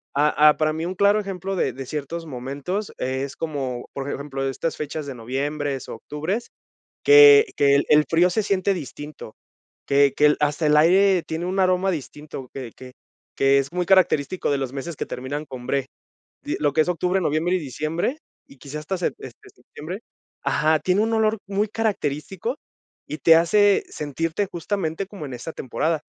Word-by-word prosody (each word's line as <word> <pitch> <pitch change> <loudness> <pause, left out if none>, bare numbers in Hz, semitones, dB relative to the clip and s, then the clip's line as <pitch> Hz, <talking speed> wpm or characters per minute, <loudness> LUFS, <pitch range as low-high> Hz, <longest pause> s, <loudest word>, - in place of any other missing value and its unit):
ah, 150 +1 +3
ah, 150 0 +6
para 155 0 +1
mí 160 - -4
un 185 - -4
claro 200 +2 +4
ejemplo 195 -1 -4
de 135 - 0
de 135 +1 -8
ciertos 155 +5 -5
momentos 145 +9 -4
es 130 +2 -3
como, 135 -6 -4
por 140 +1 -4
ejemplo, 135 -1 -4
de 135 - 0
estas 165 +5 -3
fechas 150 0 -5
de 140 - -6
noviembres, 135 +3 -3
octubres, 155 - -4 0.5
que 435 0 +8
que 140 -1 +4
el 140 - +3
el 150 0 +5
frío 175 +2 +3
se 215 +5 0
siente 195 0 +1
distinto, 150 - -8 0.5
que 140 0 +4
que 150 - +4
el 150 - +4
hasta 150 +2 0
el 150 0 +4
aire 185 +4 +5
tiene 160 +2 -4
un 190 +2 -2
aroma 185 0 +2
distinto, 145 -4 -7
que 130 -4 -7
que 130 -1 -12 0.4
que 135 0 +4
es 135 +2 -3
muy 180 0 -1
característico 180 -4 +2
de 140 - +1
los 135 -2 -4
meses 145 +4 -5
que - - -4
terminan 140 +4 -5
con 130 -3 -9
bre. 135 -2 0 0.6
Y - - -2
lo 145 -1 +2
que 155 - +2
es 165 - -5
octubre, 180 +2 0
noviembre 165 +3 +1
y - - 0
diciembre, 160 - -3 0.3
y 140 - -17
quizá 140 +3 -7
hasta 155 +6 -3
sep 175 - -1
este, 420 - -12
septiembre 185 - -9 0.5
ajá, 155 +1 +2
tiene 185 +5 +1
un 225 +1 0
olor 220 -1 +2
muy 200 +1 0
característico 205 - -2 0.5
y 150 - -5
te 165 - +6
hace 200 +5 +4
sentirte 165 +6 -2
justamente 175 0 -3
como 195 -7 -8
en 135 - -7
esa 125 +7 -7
temporada. 155 +4 -2
155 Hz, 185 wpm, -23 LUFS, 140-185 Hz, 0.6 s, que